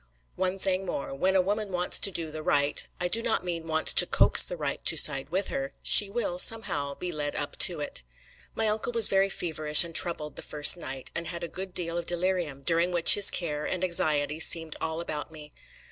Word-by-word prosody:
One 185 +1 -4
thing 190 0 -3
more: 140 -7 -7
when 185 +8 -2
a 185 - +1
woman 205 +1 -5
wants 180 0 +1
to - - +3
do 165 -4 -8
the 155 0 -8
right 145 -1 0 0.2
I 180 - -2
do 220 +6 -1
not 225 -4 -2
mean, 165 -2 -6
wants 160 0 -1
to - - +6
coax - - +4
the - - -4
right - - -6
to - - +2
side 135 0 +3
with 190 +4 -4
her 275 0 -6
she 205 - +6
will, 200 -5 -5
somehow, 145 -11 0
be 180 +3 -6
led 145 -2 -6
up 145 - -5
to 175 -5 +4
it. 145 - -4 0.5
My 225 - -1
uncle 215 +3 -3
was 230 -2 +7
very 195 0 0
feverish 155 -4 +4
and 170 -1 -10
troubled 160 -3 +1
the - - -5
first 150 +2 +4
night, 135 -6 -7
and 170 -1 -7
had 170 +1 -8
a - - -5
good 190 +1 -10
deal 170 -1 -4
of 170 - -10
delirium, 175 -5 -3
during 170 +3 0
which 175 -1 +7
his 205 -1 +5
care 150 -4 -5
and 185 -1 -5
anxiety 155 -4 -2
seemed 165 -1 +2
all 160 +1 -5
about 150 -3 -7
me. 150 -2 -12
170 Hz, 220 wpm, -25 LUFS, 155-190 Hz, 0.5 s, was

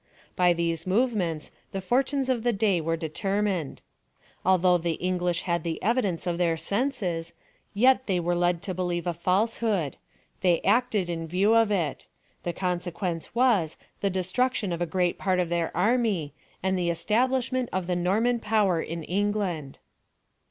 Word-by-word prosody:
By 180 -1 +4
these 170 0 -2
move 235 +6 +2
ments 165 -7 -2 0.2
the 195 - -2
fortunes 265 +7 0
of 255 -3 +1
the 240 +1 +2
day 200 -5 +1
were 165 +1 -1
determined. 190 0 -2 0.6
Although 180 -1 +4
the 170 0 -1
English 180 0 -1
had 170 -2 0
the 165 -1 -2
evidence 205 -6 0
of 175 -1 -1
theii 165 -2 +1
senses, 185 - -2 0.4
yet 260 +4 +4
they 185 -3 +1
were 175 +1 0
led 175 0 +1
to 195 -2 -3
believe 175 -1 -2
a 175 - 0
falsehood 190 -1 0 0.2
— - - -35
tliey 175 -3 +4
acted 210 -3 +2
in 165 -1 -4
view 190 +6 +2
of 225 -2 +4
it; 175 -9 -1 0.3
the 175 - -2
consequence 175 0 -3
was, 230 -11 +2 0.2
the 200 - +1
destrnction 195 +3 0
of 170 - -4
a 175 - 0
great 175 +1 0
part 185 -1 +1
of 175 -2 0
their 170 -1 0
army, 205 - +1 0.3
and 190 0 +1
the 175 -1 0
establishment 250 +8 +1
of 185 -1 -1
the 180 0 -1
Norman 215 +8 +1
power 210 -6 +2
in 165 0 -5
England. 190 -6 -1
185 Hz, 165 wpm, -27 LUFS, 170-215 Hz, 0.6 s, By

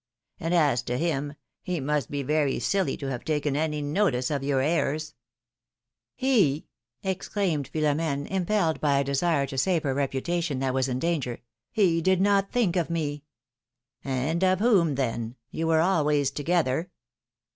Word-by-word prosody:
And, 165 - -2
as 145 -8 +3
to 125 +1 -3
him, 145 -3 -1 0.3
he 180 -2 -3
must 145 -2 -1
be 145 -1 -3
very 150 0 +1
silly 195 -2 0
to 135 -1 -4
have 125 -1 -4
taken 150 -2 -1
any 150 -1 -1
notice 145 -5 +1
of 140 -2 -1
your 140 -1 +1
airs.'^ 155 +1 0 1.9
exclaimed 190 -5 -2
Philom^ne, 150 -2 0
impelled 190 -3 0
by 145 -2 +3
a 140 - +2
desire 140 +1 +1
to 135 -1 -3
save 175 +1 +1
her 135 -3 0
reputation, 140 +3 -1
that 130 0 -1
was 130 0 +1
in 125 -1 -1
danger, 140 -5 -2 0.3
did 185 -2 +3
not 200 0 +2
think 225 -8 +1
of 170 -3 0
me!^^ 150 -3 -2 0.8
^^And 140 +6 -1
of 185 -1 +3
whom, 195 - +3
then? 120 -3 -2 0.2
You 165 - -2
were 160 -1 +4
always 150 -6 +2
together. 160 +1 0
150 Hz, 150 wpm, -26 LUFS, 140-170 Hz, 1.9 s, were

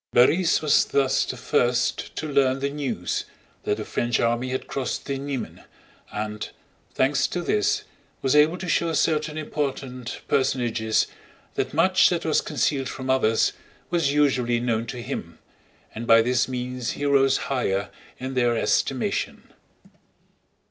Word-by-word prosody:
Borís 160 +8 +4
was 150 -1 +4
thus 135 -2 +2
the - - -5
first 120 0 0
to 155 - -3
learn 135 -2 +2
the 140 +1 -2
news 125 -12 -2 0.4
that 105 - 0
the 105 - -5
French 120 0 0
army 120 +2 +1
had 130 +1 -3
crossed 135 -2 -3
the 135 -1 -3
Niemen 140 -2 -5 0.5
and, 105 0 -4 0.5
thanks 140 +2 +2
to 175 - -3
this, 105 -10 +1 0.4
was 135 +1 +2
able 155 +4 +5
to 185 - -6
show 170 0 +1
certain 155 0 +1
important 135 -5 -4
personages 120 -5 +1 0.5
that - - -2
much 185 +3 +5
that 175 -2 -2
was 155 - +2
concealed 135 -3 -1
from 130 0 -3
others 115 -4 +2 0.4
was 165 -5 +2
usually 130 -5 +2
known 115 -1 -1
to 120 0 -6
him, - - -6 0.6
and 115 +1 -6
by 115 0 +7
this 125 0 +1
means 125 -1 -3
he 145 - -4
rose 135 -1 +4
higher 100 -7 -1 0.3
in 130 +1 -5
their 120 -2 +2
estimation. - - -1
130 Hz, 145 wpm, -24 LUFS, 120-145 Hz, 0.6 s, by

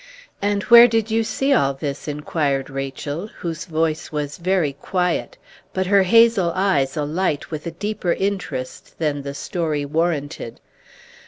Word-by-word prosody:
"And 205 0 0
where 235 0 +9
did 225 -1 0
you 225 +1 +2
see 270 +5 0
all 140 - +2
this?" 140 +1 -5
inquired 145 -2 -1
Rachel, 135 +6 -4
whose 170 -5 -6
voice 160 -2 -1
was 150 +2 -4
very 175 -5 +1
quiet, 180 +5 -2 0.4
but 185 0 0
her 200 +1 +4
hazel 225 -2 +4
eyes 160 -8 +1
alight 150 +1 -1
with 155 +1 -5
a - - -3
deeper 205 -4 -1
interest 185 -10 -4
than 150 -3 -1
the 140 0 -6
story 155 -2 -2
warranted. 155 -5 -2
165 Hz, 145 wpm, -21 LUFS, 145-195 Hz, 0.4 s, where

